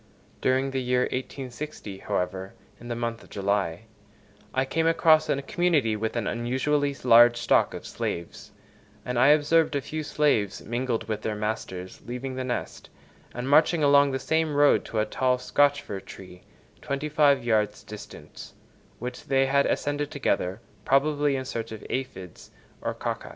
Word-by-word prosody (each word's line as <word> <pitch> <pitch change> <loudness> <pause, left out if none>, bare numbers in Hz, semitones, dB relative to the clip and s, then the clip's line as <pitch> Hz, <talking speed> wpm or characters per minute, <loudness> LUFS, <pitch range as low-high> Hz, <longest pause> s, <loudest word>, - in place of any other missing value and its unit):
During 130 +1 +1
the 135 0 -1
year 125 0 +1
1860, 130 -4 -5
however, 95 +1 -3 0.2
in 120 - -11
the 120 - -3
month 115 -1 -3
of - - -18
July, 100 -4 -1 0.7
I 130 0 0
came 165 +4 0
across 155 -1 +4
a 140 - +1
community 150 -9 +1
with 110 +2 -3
an 115 -3 -1
unusually 135 +5 0
large 120 -1 +7
stock - - +2
of - - -8
slaves, 85 0 -5 0.5
and 125 -1 -1
I 130 - +6
observed 155 +1 +4
a - - +2
few 155 +6 -5
slaves 145 -10 0
mingled 120 0 -2
with 110 -1 -3
their 110 0 -2
masters 105 -4 -5
leaving 125 +2 -5
the 130 0 -3
nest, 125 -1 -5 0.4
and 125 +1 -5
marching 155 +3 +4
along 140 0 +5
the 130 - -1
same 160 +1 0
road 145 0 +4
to 115 - -5
a 105 - +2
tall 125 +3 +1
Scotch 145 +2 +2
fir 100 - -5
tree, 90 -1 -12 0.4
twenty 140 +2 -3
five 145 -3 +3
yards 105 -3 +1
distant, 105 -1 -11 0.4
which 125 +1 -7
they 135 0 +2
ascended 145 +1 0
together, 105 - -1 0.2
probably 145 +1 +2
in 130 -1 -3
search 115 -3 -5
of 110 -2 -8
aphides 95 -10 -6 0.3
or - - -3
cocci. - - -4
130 Hz, 160 wpm, -26 LUFS, 110-145 Hz, 0.7 s, large